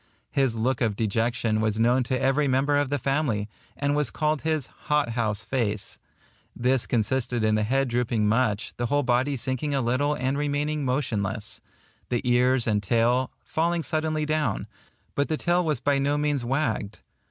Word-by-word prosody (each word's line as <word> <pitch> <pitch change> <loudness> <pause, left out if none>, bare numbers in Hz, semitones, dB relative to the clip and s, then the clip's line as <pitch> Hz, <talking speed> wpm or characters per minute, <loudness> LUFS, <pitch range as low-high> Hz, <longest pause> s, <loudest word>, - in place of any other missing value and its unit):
His 135 -4 +1
look 120 +3 0
of 110 -4 +1
dejection 115 +1 0
was 110 -1 0
known 120 +3 +4
to 130 +2 -1
every 135 +2 +2
member 135 +2 +2
of 145 -1 +1
the 145 - 0
family, 135 -6 0 0.3
and 145 0 0
was 150 -1 +1
called 155 -1 0
his 155 -4 0
hot 150 -4 -1
house 110 -2 -1
face. 110 -5 -2 0.6
This 125 +1 +1
consisted 120 0 0
in 110 0 +3
the 110 - +2
head 135 +5 +1
drooping 120 -3 +1
much, 110 -2 +1
the 120 - -1
whole 145 +3 +1
body 130 +3 +1
sinking 130 +3 -1
a - - +2
little 130 +5 +1
and 130 +2 -1
remaining 145 +1 -1
motionless; 110 -6 -2 0.5
the 120 -2 0
ears 125 0 +3
and 105 -2 +1
tail 120 +5 +2
falling 170 +1 0
suddenly 155 -1 -1
down, 155 0 0 0.5
but 140 - 0
the 155 - 0
tail 175 +2 +2
was 155 -6 0
by 140 +2 +1
no 140 +1 +1
means 145 -3 0
wagged. 120 -6 -1
130 Hz, 175 wpm, -26 LUFS, 115-145 Hz, 0.6 s, known